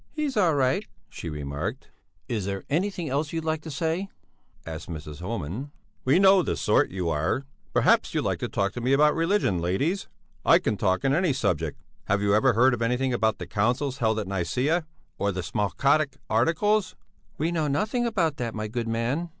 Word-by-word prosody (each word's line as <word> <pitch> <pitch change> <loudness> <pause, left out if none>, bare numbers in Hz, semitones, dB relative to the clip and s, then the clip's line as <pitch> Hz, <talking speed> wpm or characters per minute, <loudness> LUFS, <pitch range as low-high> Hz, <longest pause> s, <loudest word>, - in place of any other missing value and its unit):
"He's 300 -3 -2
all 180 -7 +3
right," 130 -2 +2 0.3
she 85 - -7
remarked. 75 - -5 0.4
"Is 110 -7 -2
there 100 -1 -3
anything 175 +1 0
else 145 +2 -1
you'd 165 -1 -3
like 160 -1 -1
to 160 - -8
say?" 165 +6 -2 0.6
asked 80 +1 -7
Mrs. 75 -2 -7
Homan. 105 - -4 0.4
"We 135 +5 +4
know 190 0 +6
the - - -2
sort - - +3
you 90 -3 -2
are! 80 - 0 0.3
Perhaps - - +3
you'd - - +1
like - - -1
to - - -2
talk 100 +1 -1
to 120 - -5
me 130 +3 +2
about 150 +2 +5
religion, 165 - +1
ladies? 140 - -1 0.4
I - - +7
can 110 - -1
talk 95 +4 0
on 135 - +3
any 170 -1 +2
subject. 85 - -1 0.3
Have 105 +1 +1
you 100 0 +2
ever 120 +4 +4
heard 120 +1 +3
anything 125 +2 +1
about 110 -3 +1
the - - -6
councils 125 +6 0
held 110 -2 +2
at 110 - -2
Nicæa, 125 - 0 0.3
or 100 - +1
the 90 -1 -4
Smalcaldic 135 - +1
Articles?" 170 - +2 0.4
"We 160 +3 0
know 160 -3 0
nothing 215 - 0
about 170 -10 0
that, 120 -2 -3
my 110 0 -3
good 115 +1 -3
man." 120 +9 -1
130 Hz, 190 wpm, -26 LUFS, 100-160 Hz, 0.6 s, I